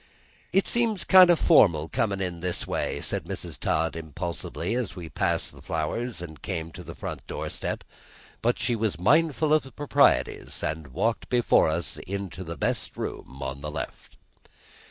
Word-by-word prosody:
"It 195 - +3
seems 230 -5 +1
kind 185 -2 +8
o' 175 - +7
formal 85 - +5
comin' 100 +5 0
in 90 -2 -3
this 90 0 -2
way," - - -2
said - - -2
Mrs. - - -6
Todd 80 +1 0
impulsively, 80 - -4
as 120 -4 -2
we 85 -3 -7
passed - - 0
the - - -14
flowers 90 +7 -3
and 80 -3 -9
came 85 -4 -4
to - - -9
the - - -9
front - - -6
doorstep; - - -4 0.6
but 120 +1 +2
she 120 0 +1
was 110 -6 -1
mindful 155 - +3
of 155 - +5
the 135 - -13
proprieties, 145 -7 +2
and 80 -1 -2
walked 110 - -1
before 120 -9 +4
us 85 +2 -2
into 95 -2 -4
the 85 -2 -6
best - - -2
room 65 +1 -6
on 65 +1 -4
the 75 - -4
left. 75 -4 -7
95 Hz, 170 wpm, -27 LUFS, 80-125 Hz, 0.6 s, kind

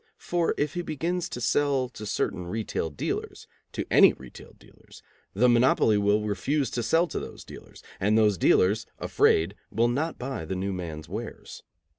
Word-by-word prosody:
For 175 -1 -1
if 145 0 -1
he 175 - -2
begins 170 +2 -3
to - - -6
sell 135 +1 +1
to 110 -4 -8
certain 90 -3 -2
retail 105 -4 -3
dealers, 75 - -4 0.3
to - - -3
any - - +7
retail 65 -1 -13
dealers, - - -18 0.3
the 120 +5 +4
monopoly 120 -3 +4
will 105 +1 +2
refuse 125 +7 -1
to 120 - -2
sell 165 +9 +2
to - - -4
those - - -9
dealers, - - -13 0.2
and 105 +3 +2
those 105 -4 +3
dealers, 105 +5 +3
afraid, 85 +4 +2 0.2
will 115 +3 +1
not 150 +7 -2
buy 130 -8 -5
the 85 +4 -4
new 95 +1 -2
man's 80 -4 -6
wares. 110 +4 -7
110 Hz, 170 wpm, -26 LUFS, 95-135 Hz, 0.3 s, any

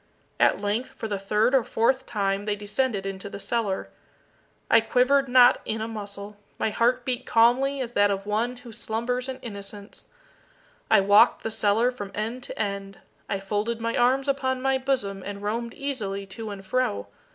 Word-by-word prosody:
At - - +4
length, 205 +5 -2
for 225 - -5
the 200 -2 -3
third 210 +5 +1
or 265 -3 +4
fourth 260 +4 +1
time 200 -3 -1
they 210 -1 0
descended 205 0 -1
into 195 0 -5
the 200 - -8
cellar. 205 -3 -2 0.8
I 230 - +6
quivered 260 +4 +3
not 245 -1 +6
in 220 - -3
a 220 - -3
muscle. 205 -2 -7 0.2
My 220 - 0
heart 245 +3 +1
beat 250 -1 -2
calmly 260 +4 +3
as 240 -2 -4
that 205 -3 +3
of 195 0 -2
one 225 +4 -1
who 245 -1 -12
slumbers 235 +3 -3
in 260 - -4
innocence. 200 -1 -8 0.8
I - - +6
walked 205 +1 +5
the 225 - -2
cellar 220 +3 +2
from 205 -6 -7
end 225 +4 -3
to - - -8
end. 200 -2 -3 0.3
I 195 - -1
folded 210 +4 -2
my 230 0 -2
arms 260 +3 +2
upon 260 -2 0
my 265 0 +1
bosom, 230 -8 -1
and 200 0 -7
roamed 230 +3 -3
easily 215 -9 -3
to 215 +3 -6
and 195 -1 -8
fro. 190 - 0
225 Hz, 180 wpm, -25 LUFS, 200-250 Hz, 0.8 s, I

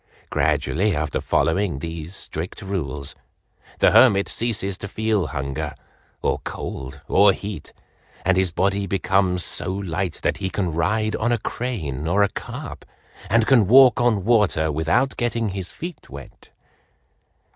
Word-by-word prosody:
Gradually 80 +7 +1
after 75 0 -2
following 85 +1 +1
these 80 +4 -6
strict 85 +4 -6
rules, 75 -7 -4 0.6
the - - +4
hermit 100 -6 +6
ceases 105 -5 -2
to 100 - -5
feel 110 -1 0
hunger 70 0 -4 0.5
or - - +1
cold 70 +1 -7
or 100 -1 +5
heat, 100 +1 -7 0.5
and 95 0 +3
his 95 0 +2
body 100 +3 0
becomes 95 -1 +1
so - - -4
light 95 -1 -3
that - - +1
he 95 - -3
can 90 -4 -2
ride 105 +7 0
on 120 +2 0
a 120 - +2
crane 80 - -4
or 100 +5 +3
a 100 - +2
carp, - - -7 0.5
and 115 +2 +3
can 115 -7 +4
walk 125 +1 +7
on 110 -6 +2
water 105 -9 +3
without 80 - +1
getting 115 -2 -1
his 95 -2 -5
feet 175 -1 -8
wet." 70 -2 -12
95 Hz, 145 wpm, -22 LUFS, 80-110 Hz, 0.6 s, walk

